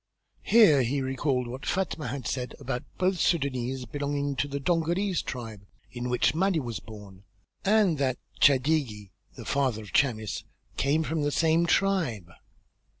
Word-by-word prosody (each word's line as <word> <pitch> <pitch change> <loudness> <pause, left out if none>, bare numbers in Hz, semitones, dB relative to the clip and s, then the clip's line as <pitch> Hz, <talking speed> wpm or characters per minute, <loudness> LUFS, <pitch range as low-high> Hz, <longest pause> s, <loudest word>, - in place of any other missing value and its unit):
Here 205 - +6
he 130 +4 0
recalled 130 -1 -1
what 125 +3 -7
Fatma 185 -5 -2
had 140 -3 -5
said 125 -2 -3
about 130 -3 -3 0.2
both 185 0 +1
Sudânese 130 -6 0
belonging 145 +2 -2
to 140 - 0
the 140 0 -4
Dongolese 175 +4 0
tribe, 110 -6 -7 0.2
in 125 0 -4
which 125 - +2
the 160 - -5
Mahdi 190 -3 +2
was 120 -5 -4
born, 100 -3 -12 0.4
and 200 -6 +3
that 130 -3 0 0.2
Chadigi, 130 -8 +2 0.2
the - - -9
father 130 -6 0
of 105 - -13
Chamis, 110 -6 +1 0.3
came 150 +3 +1
from 160 0 -2
the 145 - +1
same 165 +2 +2
tribe. 165 - +1
140 Hz, 150 wpm, -27 LUFS, 125-160 Hz, 0.4 s, Here